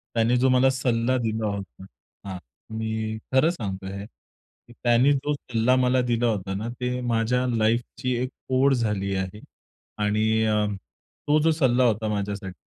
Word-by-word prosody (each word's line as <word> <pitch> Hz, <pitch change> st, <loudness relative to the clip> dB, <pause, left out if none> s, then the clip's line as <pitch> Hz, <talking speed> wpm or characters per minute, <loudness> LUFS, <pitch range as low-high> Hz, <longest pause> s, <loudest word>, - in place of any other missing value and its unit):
त्याने 115 Hz, +2 st, +3 dB
जो 130 Hz, +2 st, +3 dB
मला 130 Hz, +1 st, +4 dB
सल्ला 130 Hz, -1 st, +1 dB
दिला 110 Hz, 0 st, -1 dB
होता. 100 Hz, -2 st, -6 dB, 0.4 s
हां. 95 Hz, -2 st, -5 dB, 0.4 s
मी 110 Hz, 0 st, -2 dB, 0.2 s
खरं 130 Hz, +5 st, +5 dB
सांगतोय 95 Hz, -, -5 dB
हे 100 Hz, -, -6 dB
की 120 Hz, +2 st, -23 dB
त्यानी 120 Hz, +3 st, +4 dB
जो 145 Hz, +2 st, -1 dB
सल्ला 125 Hz, -3 st, +1 dB
मला 125 Hz, 0 st, +3 dB
दिला 120 Hz, 0 st, +1 dB
होता 95 Hz, -4 st, -2 dB
ना 105 Hz, +4 st, -3 dB
ते 125 Hz, 0 st, -1 dB
माझ्या 120 Hz, +1 st, +1 dB
लाईफची 120 Hz, +3 st, 0 dB
एक 130 Hz, -, -2 dB, 0.3 s
ओढ 135 Hz, +1 st, +4 dB
झाली 105 Hz, -5 st, -1 dB
आहे. 95 Hz, +2 st, -3 dB, 0.6 s
आणि 110 Hz, +1 st, +1 dB
अ, 105 Hz, -1 st, +2 dB, 0.6 s
तो 150 Hz, +1 st, +4 dB
जो 160 Hz, +1 st, +3 dB
सल्ला 130 Hz, -5 st, +2 dB
होता 110 Hz, -2 st, +1 dB
माझ्यासाठी 100 Hz, -2 st, -3 dB
115 Hz, 155 wpm, -25 LUFS, 105-125 Hz, 0.6 s, खरं